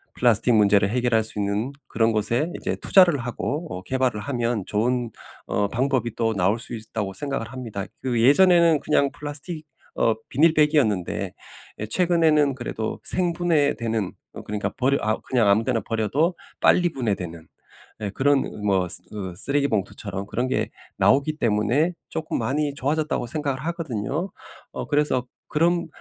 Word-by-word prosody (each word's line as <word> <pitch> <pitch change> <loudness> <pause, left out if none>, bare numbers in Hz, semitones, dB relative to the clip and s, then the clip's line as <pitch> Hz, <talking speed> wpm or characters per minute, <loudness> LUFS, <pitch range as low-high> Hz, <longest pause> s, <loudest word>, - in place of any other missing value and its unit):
플라스틱 120 0 +3
문제를 100 -1 +4
해결할 120 -1 +2
수 110 -1 -3
있는 105 +5 -1 0.2
그런 115 0 +1
곳에 120 +9 0
이제 - - -2
투자를 175 -7 +5
하고 135 +7 -3
어 90 - -6
개발을 130 -3 0
하면 120 -2 -1
'좋은 120 +3 0 0.3
어 100 +1 0
방법이 120 0 -1
또 115 -1 0
나올 100 +2 +1
수 120 - -5
있다.'고 110 -3 -4
생각을 135 +2 -4
합니다. 115 -7 -5 0.2
그 120 -3 0
예전에는 170 +3 +6
그냥 140 -2 +1
플라스틱 150 +2 -6 0.3
어 115 - +2
비닐백이었는데 150 - +2 0.5
에 110 - -3
최근에는 160 -3 +3
그래도 115 -3 -4
생분해되는 150 - 0 0.3
그러니까 105 0 -2
버려 135 +2 +2
아 110 +1 0
그냥 120 -5 +1
아무 105 +3 +4
데나 120 -4 0
버려도 130 - 0 0.3
빨리 175 -1 +4
분해되는 90 - -3 0.6
예 105 - -2
그런 140 +3 +2
으그 - - -8
뭐 95 -3 +2
쓰 90 - +3
그 95 -4 -6
쓰레기봉투처럼 100 -7 -1
그런 120 +4 -1
게 130 - -1 0.3
나오기 145 +3 +3
때문에 115 +9 +1 0.2
'쪼끔 160 0 -3
많이 145 +1 0
좋아졌다.'고 150 -2 -1
생각을 140 0 -2
하거든요. 160 - -3 0.4
어 - - -5
그래서 145 -4 +1 0.2
그럼 170 +2 +1
125 Hz, 345 characters per minute, -24 LUFS, 110-150 Hz, 0.6 s, 예전에는